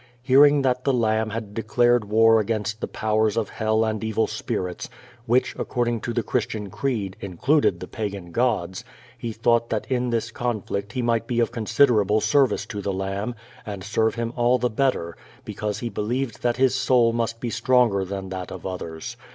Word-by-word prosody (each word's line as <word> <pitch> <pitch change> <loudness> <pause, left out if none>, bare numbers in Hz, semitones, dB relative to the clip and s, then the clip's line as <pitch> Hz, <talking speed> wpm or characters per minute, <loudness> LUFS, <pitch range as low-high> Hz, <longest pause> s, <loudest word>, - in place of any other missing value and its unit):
Hearing 140 +2 +6
that 125 -1 +1
the 135 - +2
Lamb 110 -2 +1
bad 110 -2 -5
declared 120 +1 +2
war 115 +2 +5
against 110 0 -2
the - - -2
powers 110 0 0
of 110 -3 0
hell 110 0 +1
and 110 -1 -2
evil 110 0 +1
spirits, 105 -4 -4 0.4
which, 125 +3 +2
according 120 -2 -1
to 120 - -3
the 120 -1 -1
Christian 105 -5 -2
creed, 110 -9 -2
included 130 - +1
the - - -7
pagan 100 -6 -5
gods, 100 -6 0 0.3
he 120 -1 -5
thought 115 +1 +1
that 110 - -2
in 125 -1 +1
this 115 0 -1
conflict 105 -4 -3
he 125 - -2
might 115 -1 0
be 120 -1 0
of 115 - +2
considerable 110 -2 +3
service 140 +3 +2
to 105 - -6
the 100 - -2
Lamb, 95 +5 -3 0.3
and 100 -4 -6
serve 110 +2 +1
Him 115 0 -3
all 120 +1 +3
the 125 0 -1
better, 110 -9 0 0.3
because 105 -1 -4
he 120 - -2
believed 115 +3 -3
that 120 0 0
his 130 0 +3
soul 125 -3 +3
must 115 0 -2
be 120 -1 -3
stronger 115 -4 +3
than 95 0 -5
that 95 -1 -6
of - - -8
others. 85 -4 -6
115 Hz, 185 wpm, -24 LUFS, 105-120 Hz, 0.4 s, Hearing